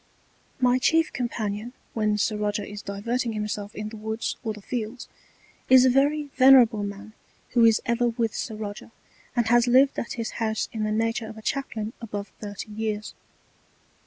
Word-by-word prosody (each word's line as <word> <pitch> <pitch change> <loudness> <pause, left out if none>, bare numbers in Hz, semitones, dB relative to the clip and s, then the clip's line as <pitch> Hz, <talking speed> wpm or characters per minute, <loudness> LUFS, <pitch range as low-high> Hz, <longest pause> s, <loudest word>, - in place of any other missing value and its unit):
My 250 0 +3
chief 325 +4 +2
Companion, 225 -1 -3 0.2
when 215 -2 +1
Sir 210 +1 +1
Roger 210 0 -1
is 205 0 -7
diverting 230 +4 -2
himself 210 -1 -4
in 210 0 -4
the 220 - -10
Woods 220 +1 -3
or 220 - -1
the 210 - -8
Fields, 235 +1 -4 0.6
is 260 0 +8
a 260 - +5
very 285 +2 +2
venerable 255 -5 +6
man 205 +1 -6 0.4
who 235 -2 +4
is 225 -2 +5
ever 235 +1 +1
with 230 -1 -1
Sir 220 - -4
Roger, 210 0 -7 0.5
and 240 -2 +2
has 240 +1 +5
lived 265 +3 +4
at 235 - -4
his 230 -2 -4
House 220 -1 -1
in 220 -2 -2
the 215 - -1
Nature 225 +1 0
of 220 0 -9
a 220 - -11
Chaplain 230 -5 -3
above 205 -3 -5
thirty 205 0 -7
Years. 215 0 -3
220 Hz, 175 wpm, -25 LUFS, 210-245 Hz, 0.6 s, is